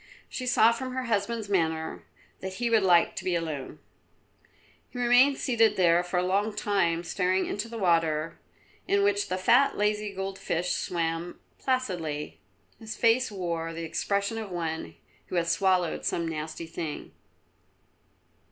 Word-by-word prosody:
She 255 - -5
saw 230 -2 +5
from 255 +2 -4
her 260 - -1
husband's 225 -1 -1
manner 160 -5 -1 0.4
that 190 0 -5
he 235 +1 -1
would 225 -2 +5
like 175 -3 +4
to - - -4
be 180 -2 0
alone. 155 -5 -4 1.1
He - - -10
remained 245 +3 +5
seated 230 -3 +2
there 175 -2 +4
for 180 0 -3
a 180 - +2
long 205 +3 0
time, 175 -5 +1
staring 185 +1 0
into 210 +3 -4
the 230 - -6
water 165 -4 +1 0.5
in 400 0 +3
which 405 0 +2
the 185 - -1
fat, 245 +9 +4
lazy, 210 0 0
gold 195 0 -5
fish 175 +2 -1
swam 165 0 -2 0.2
placidly. 175 - -2 0.4
His 220 -1 -7
face 235 +1 +3
wore 170 -4 -3
the 165 0 -5
expression 200 +6 -1
of 215 -3 -6
one 160 - -4 0.3
who - - -5
has 170 -1 +1
swallowed 185 -3 +1
some 170 -1 -1
nasty 155 +1 -5
thing. 160 -2 -6
190 Hz, 150 wpm, -28 LUFS, 165-225 Hz, 1.1 s, saw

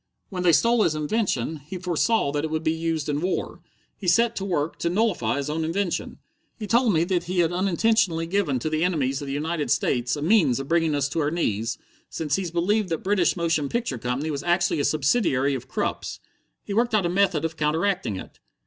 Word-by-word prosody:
"When 185 -3 -4
they 180 -1 +5
stole 230 - +4
his 155 - +2
invention, 155 - -1
he 150 +6 -8
foresaw 180 0 +1
that 145 0 -2
it 160 - -2
would 155 0 -2
be 160 - +2
used 160 -2 -2
in 145 0 -1
war. 185 +2 -2 0.3
He 195 - -7
set 230 +6 +3
to 195 - -2
work 165 -5 -2
to 170 - 0
nullify 175 - +1
his 140 0 -2
own 155 +2 -2
invention. 175 +3 -2 0.4
He 215 - -5
told 235 +2 +3
me 165 -3 +2
that 180 0 -1
he 185 +1 -3
had 165 -1 +1
unintentionally 185 -1 +1
given 165 -6 0
to 140 +6 -2
the 155 +1 +1
enemies 140 -7 0
of 140 - -6
the 135 - -3
United 155 +1 -2
States 125 +2 +1
a 145 - -4
means 160 - +3
of 135 - -5
bringing 165 -2 +2
us 140 -1 +1
to 155 - -2
our 145 -1 +1
knees, 115 -8 -1 0.3
since 150 -3 -1
he 190 -3 -2
believed 185 +4 0
that 165 -2 -3
British 190 -3 +2
motion 165 -4 0
picture 230 - -2
company 125 +7 -2
was 140 -1 -3
actually 175 -2 +1
a 145 - +1
subsidiary 140 - +2
of 130 -1 -5
Krupp's. - - -3 0.4
He - - -5
worked 235 +1 +2
out 200 -4 +2
a - - +3
method 180 -3 +1
of 165 -1 -3
counteracting 155 - 0
it." - - -9
165 Hz, 220 wpm, -24 LUFS, 145-190 Hz, 0.4 s, they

